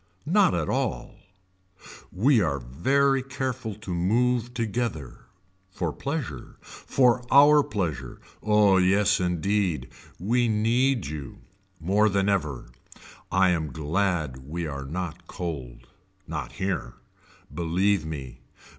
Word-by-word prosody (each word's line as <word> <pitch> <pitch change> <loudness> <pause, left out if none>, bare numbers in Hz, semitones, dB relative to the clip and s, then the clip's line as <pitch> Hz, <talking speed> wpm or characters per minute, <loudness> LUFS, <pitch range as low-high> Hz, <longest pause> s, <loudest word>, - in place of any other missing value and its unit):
Not 190 +2 +3
at - - -1
all 125 -2 -2 1.0
We 115 +5 +3
are 75 -6 0
very 135 - +1
careful 130 -4 -4
to 100 -3 -6
move 120 +7 +1
together. 110 - -3 0.4
For 85 -4 -3
pleasure. 135 - -5
For 125 -2 +1
our 145 +2 +7
pleasure. 80 - -4 0.2
Oh 105 -2 +4
yes 100 +2 +3
indeed. 90 -4 0 0.3
We 120 +7 +1
need 115 - +1
you. 75 -1 -7 0.4
More 100 +6 +2
than 100 0 +1
ever. 75 -11 -2 0.6
I 95 +1 +4
am 80 -5 -1
glad 80 -1 -1
we 85 +3 -4
are 70 -3 -5
not 85 +2 -5
cold. 65 -9 -6 0.4
Not - - -5
here. 95 -3 -3 0.6
Believe 90 +2 +1
me. 70 -5 -7
95 Hz, 110 wpm, -26 LUFS, 80-120 Hz, 1.0 s, our